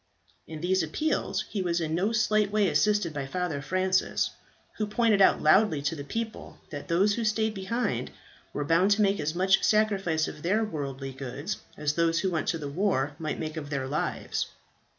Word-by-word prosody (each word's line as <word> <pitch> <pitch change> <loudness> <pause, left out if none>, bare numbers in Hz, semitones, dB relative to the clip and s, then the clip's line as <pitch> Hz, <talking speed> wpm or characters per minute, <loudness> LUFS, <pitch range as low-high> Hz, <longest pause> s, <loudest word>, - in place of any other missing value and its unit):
In 155 -1 -7
these 185 +1 +2
appeals 190 - -1
he 205 - -3
was 175 -1 0
in 160 -1 -2
no 190 +6 +1
slight 215 -2 +2
way 210 -2 +3
assisted 205 -3 +2
by 140 -2 -4
Father 175 -3 -2
Francis, 185 +4 +1 0.5
who 215 - -1
pointed 215 -1 +2
out - - +5
loudly 160 +1 +5
to 155 +3 0
the 145 - -6
people 225 +8 -5
that 145 -2 -6
those 195 +5 +3
who 235 - -2
stayed 220 0 +1
behind 225 +5 -2 0.4
were 145 - -3
bound 170 +5 +3
to 215 - +3
make 200 0 +2
as 155 +2 -2
much 190 +2 +3
sacrifice 195 -7 +2
of - - -8
their 205 +7 +1
worldly 140 -8 -4
goods, 135 +8 -5 0.2
as 150 0 0
those 165 +1 +2
who 190 - 0
went 160 -2 -1
to 165 - +1
the 150 -3 -5
war 145 -3 0
might 155 -2 -3
make 155 0 -4
of 145 -2 -5
their 140 -2 -2
lives. 145 +3 -2
180 Hz, 190 wpm, -28 LUFS, 150-210 Hz, 0.5 s, out